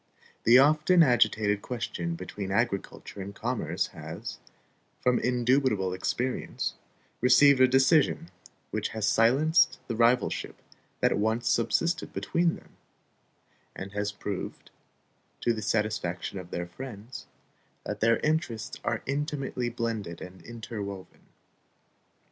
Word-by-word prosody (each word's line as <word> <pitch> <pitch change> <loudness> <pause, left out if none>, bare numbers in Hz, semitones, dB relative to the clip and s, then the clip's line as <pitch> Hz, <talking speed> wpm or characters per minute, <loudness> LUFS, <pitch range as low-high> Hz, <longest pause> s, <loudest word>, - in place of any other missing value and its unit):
The 120 +2 +8
often 155 +5 +5
agitated 110 -5 +3
question 85 -8 -4
between 95 +3 -6
agriculture 100 -1 -2
and 100 +1 -7
commerce 120 +2 -1
has, - - -7 0.6
from 125 -1 +2
indubitable 125 -6 +1
experience, 125 +7 -2 0.5
received 130 +2 +6
a 130 - +8
decision 135 +5 +3 0.4
which - - -1
has 105 -1 0
silenced 140 +10 +4
the 115 - -2
rivalship 120 +2 +1 0.4
that - - +3
once 110 +3 0
subsisted 170 +9 +1
between 170 0 +1
them, - - -17 1.0
and 95 +1 -7
has 105 0 -2
proved, 100 -1 -6 0.7
to 120 - +2
the 110 - -5
satisfaction 105 -4 -1
of 90 -1 -10
their 85 0 -3
friends, 115 +4 -9 0.6
that - - -4
their 115 +1 +4
interests 130 -7 -1
are - - -1
intimately 140 -3 -2
blended 115 -7 -3
and 90 +1 -10
interwoven. 105 -5 -8
115 Hz, 115 wpm, -28 LUFS, 100-130 Hz, 1.0 s, The